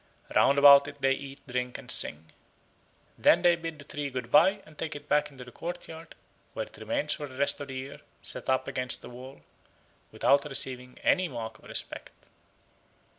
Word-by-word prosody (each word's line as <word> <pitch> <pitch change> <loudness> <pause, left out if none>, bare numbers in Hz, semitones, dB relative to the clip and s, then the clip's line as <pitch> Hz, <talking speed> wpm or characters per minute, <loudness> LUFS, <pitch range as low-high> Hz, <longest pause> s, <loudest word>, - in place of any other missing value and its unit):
Round 140 - +4
about 140 0 +8
it 145 0 -10
they 135 0 +3
eat, 135 +1 -9
drink, 125 -1 -3
and - - -7
sing. 80 +2 0 0.9
Then 175 - +5
they 175 -1 +5
bid 165 -2 -6
the 140 - -13
tree 145 -1 -4
good 125 -2 -6
bye 200 +1 +5
and 155 0 -17
take 155 0 -5
it 145 0 -10
back 150 0 +3
to 145 -2 -12
the 125 -1 -11
courtyard, 165 0 -8 0.4
where - - -3
it - - -17
remains 285 0 0
for 145 - -5
the 130 -1 -13
rest 140 +1 +3
of 145 - -6
the 135 - -7
year, 130 +2 -7 0.2
set - - -5
up 130 0 +1
against 125 -2 +1
the - - -10
wall, 130 +3 -11 0.7
without 140 +1 +3
receiving 130 -3 -1
any 185 -1 +3
mark 115 -6 -7
of - - -20
respect. - - -3
140 Hz, 190 wpm, -28 LUFS, 130-155 Hz, 0.9 s, about